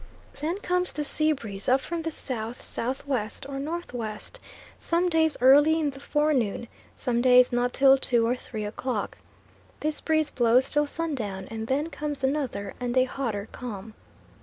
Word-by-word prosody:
Then 320 Hz, +6 st, -1 dB
comes 360 Hz, -6 st, +2 dB
the 300 Hz, -, -2 dB
sea 310 Hz, +2 st, +2 dB
breeze 215 Hz, -9 st, -3 dB
up 260 Hz, +2 st, +5 dB
from 335 Hz, +4 st, -4 dB
the 325 Hz, -, -2 dB
south 240 Hz, -6 st, -4 dB
south 255 Hz, +4 st, -2 dB
west 250 Hz, -4 st, -3 dB
or 275 Hz, -1 st, -5 dB
north 330 Hz, +1 st, -5 dB
west, 215 Hz, -3 st, -6 dB, 0.4 s
some 345 Hz, +2 st, +1 dB
days 320 Hz, -2 st, +2 dB
early 290 Hz, +5 st, +6 dB
in 295 Hz, -3 st, 0 dB
the 270 Hz, -, -12 dB
forenoon, 275 Hz, -7 st, 0 dB, 0.3 s
some 240 Hz, -1 st, -1 dB
days 250 Hz, 0 st, +6 dB
not 245 Hz, +1 st, +1 dB
till 270 Hz, 0 st, +5 dB
two 240 Hz, -3 st, +2 dB
or 240 Hz, +2 st, +1 dB
three 220 Hz, -4 st, -6 dB
o'clock. 245 Hz, +4 st, -3 dB, 0.6 s
This 305 Hz, 0 st, -2 dB
breeze 315 Hz, -1 st, +1 dB
blows 245 Hz, +2 st, +3 dB
till 295 Hz, 0 st, +2 dB
sundown, 235 Hz, -13 st, -4 dB
and 220 Hz, 0 st, -5 dB
then 290 Hz, +6 st, -1 dB
comes 295 Hz, -2 st, -4 dB
another 265 Hz, -7 st, -1 dB
and 245 Hz, 0 st, -2 dB
a 255 Hz, -, +6 dB
hotter 230 Hz, -6 st, -3 dB
calm. 220 Hz, -3 st, -7 dB
265 Hz, 170 wpm, -26 LUFS, 235-300 Hz, 0.6 s, early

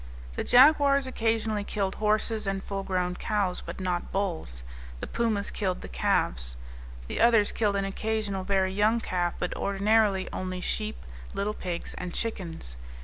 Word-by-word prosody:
The -, -, -1 dB
jaguars 280 Hz, +1 st, +6 dB
occasionally 225 Hz, -4 st, 0 dB
killed 195 Hz, -2 st, -1 dB
horses 215 Hz, 0 st, +1 dB
and 195 Hz, 0 st, -1 dB
full 195 Hz, -1 st, -3 dB
grown 180 Hz, -2 st, -1 dB
cows, 200 Hz, -2 st, -1 dB
but 170 Hz, +2 st, -7 dB
not 180 Hz, -2 st, -2 dB
bulls. 165 Hz, -, -3 dB, 0.4 s
The -, -, -4 dB
pumas 220 Hz, -4 st, 0 dB
killed 185 Hz, -3 st, -2 dB
the -, -, -7 dB
calves. -, -, 0 dB, 0.5 s
The -, -, -2 dB
others 225 Hz, -3 st, +5 dB
killed 210 Hz, -3 st, +1 dB
an 195 Hz, 0 st, 0 dB
occasional 205 Hz, -1 st, -2 dB
very 190 Hz, -1 st, +1 dB
young 215 Hz, +4 st, +3 dB
calf, 175 Hz, -5 st, -1 dB
but 180 Hz, -, -2 dB
ordinarily 200 Hz, -1 st, +2 dB
only 185 Hz, 0 st, -3 dB
sheep, 215 Hz, +3 st, -2 dB, 0.3 s
little 205 Hz, +2 st, -1 dB
pigs, 175 Hz, -4 st, -4 dB
and 180 Hz, -1 st, -5 dB
chickens. 170 Hz, -, -4 dB
200 Hz, 150 wpm, -28 LUFS, 180-220 Hz, 0.5 s, jaguars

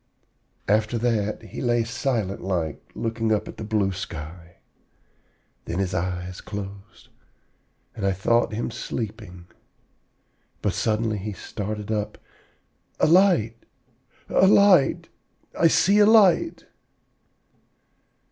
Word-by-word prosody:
"After 110 Hz, +3 st, +1 dB
that, 110 Hz, -3 st, -1 dB
he 110 Hz, -, -8 dB
lay 120 Hz, -2 st, +1 dB
silent 115 Hz, -4 st, -2 dB
like, 85 Hz, -5 st, -2 dB
looking 115 Hz, -1 st, -2 dB
up 105 Hz, -, 0 dB
at -, -, -9 dB
the -, -, -6 dB
blue 105 Hz, -3 st, 0 dB
sky. 85 Hz, -1 st, -8 dB, 1.1 s
Then 85 Hz, -, -4 dB
his 95 Hz, -1 st, -1 dB
eyes 90 Hz, 0 st, -3 dB
closed, 100 Hz, +1 st, -9 dB, 0.9 s
and 105 Hz, -, -6 dB
I 100 Hz, -, +2 dB
thought 115 Hz, +6 st, +1 dB
him 110 Hz, +2 st, -3 dB
sleeping. 90 Hz, -6 st, -6 dB, 1.2 s
But -, -, +1 dB
suddenly 110 Hz, -1 st, -1 dB
he 105 Hz, +2 st, -5 dB
started 105 Hz, +2 st, -6 dB
up, 105 Hz, -1 st, -2 dB, 0.8 s
'A -, -, +4 dB
light, 165 Hz, -, +4 dB, 0.7 s
a 190 Hz, -, +4 dB
light! 200 Hz, -7 st, +4 dB, 0.5 s
I 170 Hz, -, +4 dB
see 200 Hz, +5 st, +3 dB
a 205 Hz, -, +6 dB
light!' 220 Hz, -, +4 dB
110 Hz, 110 wpm, -24 LUFS, 95-120 Hz, 1.2 s, a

